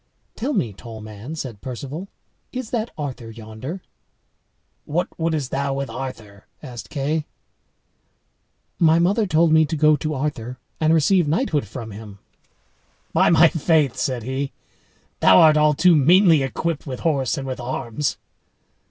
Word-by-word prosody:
"Tell 265 +6 -2
me, 115 - -1
tall 110 +2 -10
man," 110 +7 -8
said 120 -9 -6
Perceval, 140 - -6 0.4
"is 255 -3 -5
that 230 -1 -1
Arthur 130 -6 -5
yonder?" 115 - -8 1.0
"What 170 +4 -1
wouldst 160 -5 -1
thou 140 0 -1
with 140 0 -3
Arthur?" 110 -6 -8 0.2
asked 120 -2 -8
Kay. 150 +2 -2 1.5
"My 165 -1 +5
mother 200 +6 +2
told 165 -1 +3
me 160 0 +6
to 160 - -2
go 155 +1 +5
to 155 +2 -3
Arthur 130 -3 -3 0.2
and 155 0 +3
receive 165 +2 +3
knighthood 155 - 0
from 110 +2 -7
him." 105 -1 -10 1.0
"By - - +4
my 165 0 +7
faith," 155 -5 +2
said 125 -4 -2
he, 135 +3 -3 0.7
"thou 95 - +7
art 155 -1 +7
all 150 0 +4
too 175 +3 +5
meanly 165 +2 +5
equipped 150 +4 -3
with 130 -2 -5
horse 145 -2 0
and 135 - -4
with 130 -1 -4
arms." 120 +2 -3
145 Hz, 145 wpm, -22 LUFS, 125-160 Hz, 1.5 s, my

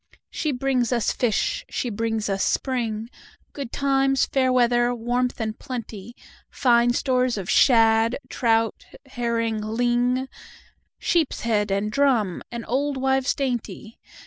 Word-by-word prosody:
She 310 - -2
brings 255 -2 0
us 235 -3 +1
fish—she 240 +1 -1
brings 225 0 -2
us 195 -1 -1
spring, 230 -4 -1 0.5
Good 275 -4 -6
times, 270 -1 +2
fair 260 -1 +1
weather, 240 -1 +2
warmth, 245 +2 -1
and 220 -1 -3
plenty, 235 -4 -7 0.3
Fine 240 -2 +3
stores 255 -2 +1
of 190 -3 -5
shad, 225 0 +4
trout, 225 -2 0 0.2
herring, 230 -4 -2
ling, 245 +4 0 0.7
Sheepshead 230 -10 0
and 200 +2 -1
drum, 240 -9 +1
and 235 -1 -6
old 280 +3 -1
wives 265 0 +1
dainty. 240 -4 -4
240 Hz, 120 wpm, -23 LUFS, 225-260 Hz, 0.7 s, shad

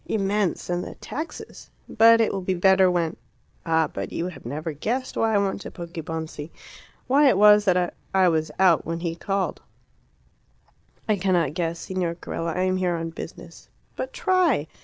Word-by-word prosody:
"Immense; 200 -3 -1
and 175 0 -1
the - - -8
taxes! 310 +4 -8 0.2
But 230 +1 +6
it 225 - +1
will 195 - -2
be 185 0 -1
better 190 +1 +5
when 170 -2 -1 0.5
Ah! 160 0 +3
but - - -6
you 175 +2 -3
have 180 - -11
never 155 +5 -4
guessed 245 - -3
why 225 -1 +1
I - - +5
went 200 0 -1
to - - -7
Poggibonsi 160 -3 -6 0.6
why 280 +2 +5
it - - +3
was 210 0 +6
that 180 -2 +2 0.2
I 190 -1 +4
was 160 -2 +1
out 185 -4 +4
when 165 +1 -4
he 170 -1 -2
called." 195 +3 -2 1.5
"I 215 -2 +2
cannot 175 -6 +1
guess, 170 -1 -2
Signor 180 -2 -3
Carella. 165 -1 -4
I 180 - 0
am 185 0 +1
here 180 -2 0
on 165 0 -4
business." - - -10 0.3
"But - - -4
try." 360 - +2
180 Hz, 175 wpm, -24 LUFS, 165-205 Hz, 1.5 s, But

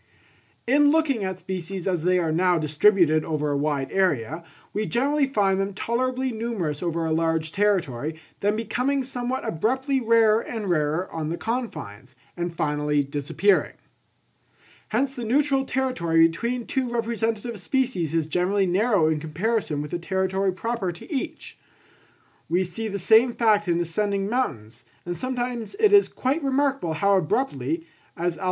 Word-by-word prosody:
In 285 +4 +4
looking 290 -8 +2
at 190 -1 -3
species 185 0 -5
as 180 -4 0
they 180 +1 +3
are 165 -3 0
now 180 +2 +3
distributed 155 +1 +3
over 150 -2 -1
a - - 0
wide 140 -2 -1
area, 160 - 0 0.3
we 210 +1 -1
generally 280 +4 +1
find 195 -7 +1
them 195 0 -3
tolerably 255 +4 -1
numerous 220 -10 -3
over 170 -2 -1
a 160 - -1
large 160 -1 0
territory, 160 -8 0 0.2
then 205 +1 +1
becoming 255 +5 -1
somewhat 255 0 -3
abruptly 260 - 0
rarer 225 -1 +4
and 215 -6 -4
rarer 155 +2 0
on 155 -1 -3
the 170 - -3
confines, 220 - -5 0.2
and 175 -1 -4
finally 150 -1 0
disappearing. 145 +8 +1 1.2
Hence 260 +5 0
the 245 - -6
neutral 270 +3 +2
territory 175 -13 +2
between 235 +8 -3
two 260 -2 -1
representative 230 -1 -2
species 185 - -1
is 165 -2 +1
generally 180 +5 +1
narrow 190 -1 +2
in 155 -1 +1
comparison 160 0 -1
with 150 - -8
the 175 - -2
territory 190 +2 0
proper 205 0 -2
to 175 - -10
each. 315 +3 -5 0.9
We 175 +3 +2
see 185 +5 -5
the 200 -1 -3
same 225 +5 +4
fact 210 -3 +3
in 170 -1 +1
ascending 195 +3 -1
mountains, 130 - -3 0.2
and 175 0 -3
sometimes 245 - -3
it 425 -2 +4
is 405 0 +6
quite 270 +6 -1
remarkable 275 - 0
how 200 +5 +3
abruptly, 270 - -1 0.3
as 175 0 -1
Alph. - - -13
195 Hz, 155 wpm, -24 LUFS, 165-245 Hz, 1.2 s, is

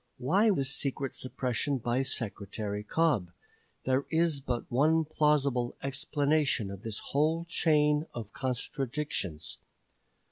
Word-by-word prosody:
Why 190 - +3
this 135 -9 +2
secret 135 -1 -2
suppression 130 +2 -1
by 120 +1 0
Secretary 105 -4 -3
Cobb? 130 - +1 0.6
There 130 +1 +1
is 160 -3 +1
but 125 -3 -2
one 155 +6 +3
plausible 145 -5 +1
explanation 140 -4 +1
of 100 -1 -8
this 110 -1 -4
whole 160 +4 +2
chain 150 -2 +2
of 110 -3 -7
contradictions. 130 - -3
135 Hz, 110 wpm, -30 LUFS, 120-150 Hz, 0.6 s, Why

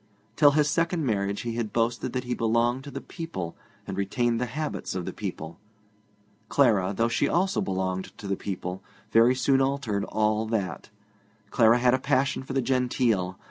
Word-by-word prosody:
Till 145 0 +6
his 150 -1 +4
second 165 +1 0
marriage 100 -3 -1
he 120 -1 -3
had 115 -2 -3
boasted 120 +1 0
that 125 -1 -2
he 125 0 -2
belonged 120 +3 +1
to - - -7
the - - -6
people 130 - -6 0.3
and - - -5
retained 115 +4 0
the 125 - 0
habits 150 -6 -4
of 90 -2 -3
the - - -5
people. 80 +1 -6 0.9
Clara, 110 -10 +3
though 115 - +3
she 115 - +1
also 190 +3 +1
belonged 95 -1 -2
to 100 - -8
the 100 - 0
people, 95 -1 -5 0.3
very 115 +3 +5
soon 135 +1 +3
altered 135 -7 0
all 110 0 0
that. 100 -6 -3 0.6
Clara 115 0 +5
had 125 0 +3
a 130 - +2
passion 135 +1 +1
for 135 0 -7
the 135 -1 +1
genteel. 120 -7 +1
115 Hz, 180 wpm, -26 LUFS, 100-130 Hz, 0.9 s, Till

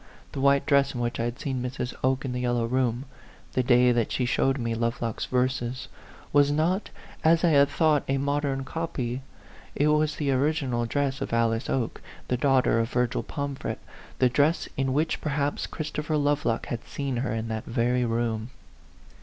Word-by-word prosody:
The 135 - -4
white 140 0 +4
dress 140 -2 +3
in - - -3
which 120 0 -2
I 115 - 0
had 120 0 -3
seen 130 -3 -2
Mrs. 125 0 -3
Oke 130 +1 +1
in 130 - -2
the 125 - -2
yellow 120 -1 0
room, 125 +1 0 0.5
the 130 - +2
day 125 0 +5
that 120 -2 +1
she 125 - 0
showed 135 +2 +1
me 115 -3 -2
Lovelock's 115 0 -2
verses, 125 -1 -1 0.4
was 145 0 +5
not, 165 +7 +1 0.3
as 165 +1 +4
I 175 - +5
had 140 -2 +5
thought, 155 -1 +3
a 135 - +1
modern 140 -1 -1
copy; 135 -4 -3 0.5
it 150 +1 +3
was 150 0 +2
the 145 -2 0
original 130 -3 0
dress 135 +2 -1
of - - -3
Alice 115 0 +1
Oke, 125 -4 -1 0.3
the 125 - +2
daughter 130 -3 +3
of 115 0 0
Virgil 125 -1 0
Pomfret 140 -1 -4 0.4
the 130 - +4
dress 145 +6 +2
in 135 -1 0
which, 155 +3 0
perhaps, 145 -1 -1
Chris 155 -1 -5
topher 150 +1 -1
Lovelock 145 -6 +1
had 115 - -4
seen 140 -3 -3
her 125 +2 -1
in 110 0 -2
that 110 -1 -3
very 125 +1 +1
room. 115 -1 -1
130 Hz, 185 wpm, -26 LUFS, 120-145 Hz, 0.5 s, day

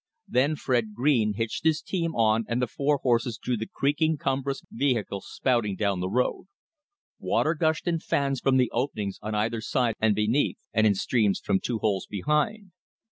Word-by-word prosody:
Then 140 +5 +2
Fred 120 -7 -1
Green 120 -5 +2
hitched 115 +6 -3
his 160 -1 +3
team 165 -2 -3
on 110 0 +3
and 120 +1 -1
the 125 - +2
four 140 +5 0
horses 120 -2 +1
drew 125 - -2
the 110 0 -5
creaking, 155 +3 +1
cumbrous 135 0 -2
vehicle 115 -7 -1
spouting 115 -6 0
down 100 -2 0
the 90 +1 -2
road. 125 - -1 0.7
Water 155 - +1
gushed 160 +1 0
in 170 -1 +1
fans 140 -3 0
from 130 +1 +2
the 125 -2 +2
openings 110 -6 -2
on 110 0 -3
either 110 +2 0
side 120 0 0
and 110 -2 +3
beneath; 110 +7 +1 0.2
and 110 0 +4
in 100 - +3
streams 105 0 +1
from 95 - 0
two 120 +2 -2
holes 100 -4 -1
behind. 150 - -1
120 Hz, 180 wpm, -26 LUFS, 110-145 Hz, 0.7 s, and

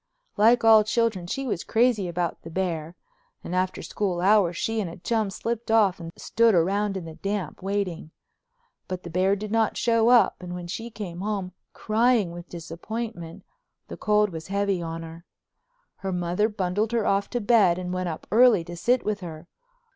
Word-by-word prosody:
Like 230 +3 +4
all 220 -1 +7
children, 215 -4 0
she 270 +9 -3
was 210 -9 -2
crazy 225 -4 +2
about 175 -1 -3
the 165 - -9
bear, 170 -2 -3 0.5
and 175 - -6
after 185 0 -1
school 190 -4 -2
hours 185 -2 +3
she 225 0 -1
and 185 - -3
a 165 - -10
chum 220 +2 -1
slipped 230 +3 -4
off 210 -4 +3
and 165 -1 -7
stood 230 -2 +2
around 195 +4 +1
in 180 - -6
the 160 - -8
damp, 195 0 -4
waiting. 195 -5 -3 0.8
But 185 -1 -5
the 170 - -8
bear 185 +3 +2
did 210 +1 -6
not 225 -1 +1
show 230 -1 +3
up 245 -1 +5
and 180 0 -6
when 175 -1 -6
she 225 +7 -5
came 200 -6 -7
home, 200 -3 -3 0.2
crying 225 -3 +2
with 175 0 -10
disappointment, 170 +2 -6 0.5
the - - -6
cold 210 -1 +2
was 160 -1 -7
heavy 200 -2 0
on 165 0 -5
her. 165 +1 -10 0.7
Her 195 - -4
mother 180 +4 0
bundled 205 +2 -1
her 230 -3 +1
off 200 0 +1
to 245 - -2
bed 205 -6 +4
and 180 0 -4
went 185 -1 -2
up 160 - -6
early 230 -5 +5
to 175 +1 -8
sit 245 +9 +1
with 210 -1 -1
her. 165 -2 -9
195 Hz, 185 wpm, -25 LUFS, 175-220 Hz, 0.8 s, all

